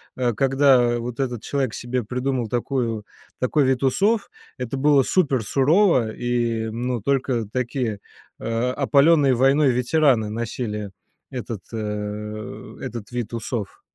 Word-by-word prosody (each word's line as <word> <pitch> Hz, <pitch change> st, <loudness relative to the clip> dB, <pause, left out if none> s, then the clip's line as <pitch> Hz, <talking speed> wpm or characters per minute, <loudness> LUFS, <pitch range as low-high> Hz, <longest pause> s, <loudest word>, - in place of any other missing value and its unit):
э, 125 Hz, -2 st, 0 dB
когда 135 Hz, -1 st, +4 dB
вот 120 Hz, +1 st, -5 dB
этот 125 Hz, -4 st, -2 dB
человек 135 Hz, -5 st, -1 dB
себе 120 Hz, 0 st, -3 dB
придумал 125 Hz, +1 st, -1 dB
такую 120 Hz, -2 st, -1 dB, 0.4 s
такой 135 Hz, +3 st, +2 dB
вид 130 Hz, 0 st, +1 dB
усов, 200 Hz, -, +2 dB, 0.3 s
это 125 Hz, +1 st, -4 dB
было 140 Hz, 0 st, +4 dB
супер 135 Hz, -7 st, +1 dB
сурово 135 Hz, -, +3 dB
и, 120 Hz, -2 st, -1 dB
ну, 120 Hz, +1 st, -2 dB
только 130 Hz, -1 st, 0 dB
такие, 120 Hz, -3 st, -2 dB, 0.4 s
а, 115 Hz, +2 st, -1 dB
опалённые 140 Hz, 0 st, +4 dB
войной 135 Hz, +3 st, +4 dB
ветераны 125 Hz, -2 st, +2 dB
носили 105 Hz, -2 st, -4 dB, 0.4 s
этот, 115 Hz, -5 st, -6 dB
э, 105 Hz, 0 st, -5 dB
этот 120 Hz, -4 st, -7 dB
вид 120 Hz, -2 st, -4 dB
усов. 115 Hz, -3 st, -4 dB
125 Hz, 125 wpm, -23 LUFS, 115-135 Hz, 0.4 s, когда